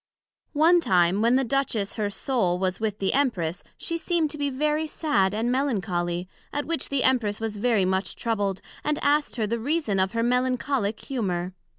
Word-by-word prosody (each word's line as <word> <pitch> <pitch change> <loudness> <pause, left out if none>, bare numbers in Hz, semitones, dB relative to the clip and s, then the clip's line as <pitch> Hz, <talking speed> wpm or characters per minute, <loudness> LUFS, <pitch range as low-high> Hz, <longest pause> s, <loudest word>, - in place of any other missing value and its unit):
One 335 +3 +6
time, 180 - +3
when 235 +2 +4
the 265 - +3
Duchess 235 -5 -1
her 210 -2 -1
Soul 200 -5 0
was 185 0 -1
with 215 -2 -2
the 195 -2 0
Empress, 185 - 0
she 335 0 -3
seem'd 330 -3 0
to 300 - -5
be 285 -1 0
very 300 +3 0
sad 290 - +1
and 230 +3 0
melancholy; 185 -9 -1 0.2
at 290 - -2
which 330 -4 -2
the 280 -2 +1
Empress 235 -6 +2
was 220 -2 -3
very 215 -3 +2
much 190 -1 -1
troubled, 205 -5 -1 0.2
and 300 0 0
asked 290 +1 +2
her 225 -3 0
the 230 +2 -2
reason 260 - 0
of 190 +2 +1
her 230 0 0
Melancholick 250 -2 0
humour? 185 -8 -2
230 Hz, 185 wpm, -25 LUFS, 195-280 Hz, 0.2 s, One